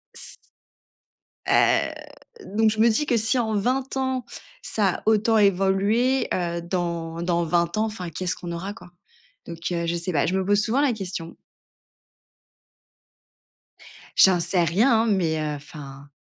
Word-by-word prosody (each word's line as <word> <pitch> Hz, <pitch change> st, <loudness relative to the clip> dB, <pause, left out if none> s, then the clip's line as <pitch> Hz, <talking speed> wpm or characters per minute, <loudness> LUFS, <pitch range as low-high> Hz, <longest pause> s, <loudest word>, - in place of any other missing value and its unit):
S -, -, -8 dB, 1.1 s
Heu, -, -, +3 dB, 0.6 s
donc 220 Hz, 0 st, +4 dB
je 215 Hz, 0 st, -3 dB
me 230 Hz, +1 st, +5 dB
dis 260 Hz, +7 st, +1 dB
que: 240 Hz, -, +1 dB
«Si 225 Hz, +4 st, +1 dB
en 220 Hz, -2 st, -1 dB
20 255 Hz, +6 st, -1 dB
ans, 260 Hz, -1 st, -1 dB, 0.4 s
ça 200 Hz, -4 st, 0 dB
a -, -, -9 dB
autant 220 Hz, +1 st, +3 dB
évolué, 200 Hz, +6 st, +2 dB
heu, 170 Hz, -1 st, -2 dB
dans 170 Hz, -2 st, -3 dB
dans 170 Hz, -1 st, 0 dB
20 170 Hz, +3 st, 0 dB
ans, 220 Hz, -, +2 dB
enfin 185 Hz, -6 st, -5 dB
qu'est-ce 180 Hz, +3 st, -3 dB
qu'on 175 Hz, -1 st, -7 dB
aura 190 Hz, +4 st, -5 dB
quoi?» 180 Hz, -5 st, -15 dB, 0.5 s
Donc, 170 Hz, -1 st, -8 dB
heu, 170 Hz, -1 st, -1 dB
je 170 Hz, -, 0 dB
sais 170 Hz, +2 st, -3 dB
pas. 145 Hz, -5 st, +1 dB
Je 185 Hz, -, -1 dB
me 190 Hz, -, -1 dB
pose 205 Hz, +1 st, +3 dB
souvent 240 Hz, +6 st, +1 dB
la 275 Hz, -5 st, +2 dB
question. 180 Hz, -5 st, -6 dB, 2.8 s
J'en 185 Hz, -2 st, +6 dB
sais 175 Hz, +1 st, +2 dB
rien 220 Hz, -, +3 dB
hein, -, -, -1 dB
mais, 175 Hz, -7 st, +1 dB
heu, 150 Hz, -1 st, -2 dB
enfin 140 Hz, -1 st, -11 dB
190 Hz, 160 wpm, -24 LUFS, 170-220 Hz, 2.8 s, J'en